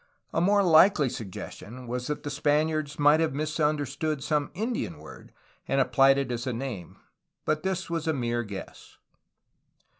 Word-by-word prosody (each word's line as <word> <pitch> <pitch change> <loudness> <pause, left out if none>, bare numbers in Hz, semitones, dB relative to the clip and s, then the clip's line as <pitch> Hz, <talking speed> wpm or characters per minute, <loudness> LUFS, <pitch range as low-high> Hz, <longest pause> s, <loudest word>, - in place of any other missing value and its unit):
A 165 - +1
more 200 +3 +4
likely 160 -4 +5
suggestion 115 +3 -8
was 125 +1 -4
that 150 +1 -3
the 145 - -4
Spaniards 150 +1 0
might 145 +1 +5
have 160 -4 0
misunderstood 150 -1 -1
some 150 -2 0
Indian 215 - -3
word 75 +1 -13 0.4
and 135 - +1
applied 135 +1 +4
it 135 -2 -1
as 120 +1 -3
a 130 - -1
name, 115 -7 -6 0.5
but 155 0 0
this 190 +1 -2
was 165 -1 -3
a - - +3
mere 120 -3 -1
guess. 100 -4 -9
145 Hz, 155 wpm, -27 LUFS, 125-155 Hz, 0.5 s, likely